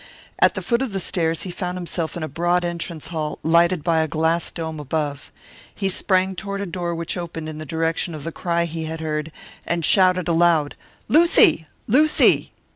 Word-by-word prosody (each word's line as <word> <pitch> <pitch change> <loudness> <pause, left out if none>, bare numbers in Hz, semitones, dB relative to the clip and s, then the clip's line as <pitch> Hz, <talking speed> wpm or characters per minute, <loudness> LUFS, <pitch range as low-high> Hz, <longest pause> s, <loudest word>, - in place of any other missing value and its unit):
At - - +4
the - - -4
foot 235 0 +1
of 260 -6 -3
the 195 - -1
stairs 165 -3 0
he 185 - -5
found 180 0 -4
himself 175 -2 -4
in 170 - -4
a - - -2
broad 175 +4 0
entrance 170 -2 -5
hall, 155 -3 -3
lighted 170 +1 +3
by 165 -2 +2
a 160 - 0
glass 160 +2 +1
dome 160 -2 -5
above. 145 -1 -3 0.4
He 195 -2 -1
sprang 190 0 +1
toward 200 +2 -5
a 200 - -3
door 175 -1 -3
which 165 0 -4
opened 165 -2 -6
in 155 -1 -7
the 155 - -7
direction 165 +2 -1
of 150 - -8
the 165 - -4
cry 170 0 -1
he 165 -1 -5
had 160 +1 -5
heard, 155 0 -3 0.3
and 170 -2 -1
shouted 185 -2 +4
aloud, 165 -3 +3 0.3
"Lucy! 315 - +5 0.2
Lucy!" 300 +7 +4
170 Hz, 195 wpm, -22 LUFS, 160-180 Hz, 0.4 s, Lucy